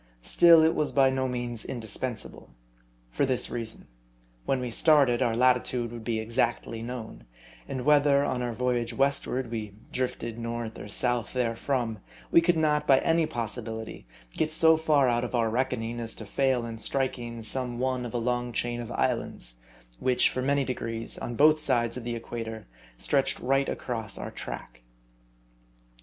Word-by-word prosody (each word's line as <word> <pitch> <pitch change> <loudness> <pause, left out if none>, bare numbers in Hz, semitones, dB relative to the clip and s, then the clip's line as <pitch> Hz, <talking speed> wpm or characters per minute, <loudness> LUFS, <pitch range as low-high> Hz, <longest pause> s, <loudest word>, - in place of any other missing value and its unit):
Still, 165 - +7
it 160 - +4
was 150 - 0
by 135 -1 +4
no 130 0 0
means 120 -2 -3
indispensable.. 120 0 -5 0.6
For - - 0
this 130 -2 0
reason. 115 -2 -5 0.6
When 135 - +1
we 125 -1 -3
started, 135 -3 +4
our 120 -3 +2
latitude 125 -1 +2
would 120 -1 -8
be 115 -1 -1
exactly 115 0 -1
known; 115 - -7 0.4
and 130 -1 -4
whether, 145 -1 +5
on 125 -3 -1
our 120 -1 -1
voyage 120 0 -1
westward, 135 -3 0
we 105 -3 -5 0.2
drifted 120 -2 -3
north 115 -1 -4
or - - -7
south 120 +2 0
therefrom, 120 -2 -1 0.3
we 170 - +7
could 170 0 +2
not, 150 -1 +1
by 135 - +7
any 165 -1 +2
possibility, 110 - -5 0.2
get 155 - -1
so 160 0 +5
far 155 -4 +3
out 120 0 +1
of 125 - -3
our 115 -2 +2
reckoning, 120 -1 -1
as 115 -1 -4
to 110 - -8
fail 130 +2 +1
in 115 -1 -6
striking 120 -2 -2
some 125 +2 -2
one 130 0 -1
of 120 -1 -6
a - - +2
long 120 +1 -1
chain 120 +1 -1
of 120 0 -7
islands, 115 - -2 0.4
which, 125 -1 +3
for 130 - -2
many 140 +1 +2
degrees, 115 -3 -4
on 120 - -4
both 155 +4 +5
sides 120 -6 +1
of 125 - -5
the 120 0 -3
equator, 115 -1 -6 0.3
stretched 135 - +1
right 135 +2 +1
across 115 -4 -4
our - - -6
track. - - -8
120 Hz, 165 wpm, -28 LUFS, 115-135 Hz, 0.6 s, Still